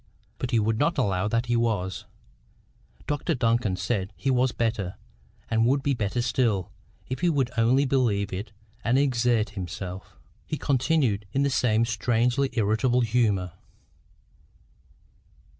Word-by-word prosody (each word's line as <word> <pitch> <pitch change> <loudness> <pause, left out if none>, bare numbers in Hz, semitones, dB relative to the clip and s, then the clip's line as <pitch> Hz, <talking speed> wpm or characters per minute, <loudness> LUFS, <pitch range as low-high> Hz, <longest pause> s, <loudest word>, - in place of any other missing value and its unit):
But 125 - -2
he 120 - +2
would 110 +1 +1
not 160 +3 +1
allow 100 -6 +1
that 115 +3 0
he 120 0 0
was. 105 -6 -1 1.0
Dr 150 +3 -1
Duncan 115 -5 +1
said 95 +1 -2
he 135 - -1
was 125 0 +2
better, 110 -6 -2 0.5
and 115 0 +2
would 135 +2 +2
be 140 - +1
better 120 0 -1
still, 115 -6 0 0.4
if 130 +1 -4
he 175 - +2
would 135 -6 +1
only 120 +5 +3
believe 110 -7 +1
it 105 +3 -5 0.3
and 120 +3 +2
exert 120 -5 +2
himself. 95 -1 -7 0.3
He 155 - -3
continued 130 -7 +1
in 140 - +2
the 140 - +1
same 115 -3 +2
strangely 120 +4 +1
irritable 115 +3 +2
humour. 110 -6 +1
115 Hz, 140 wpm, -26 LUFS, 105-130 Hz, 1.0 s, only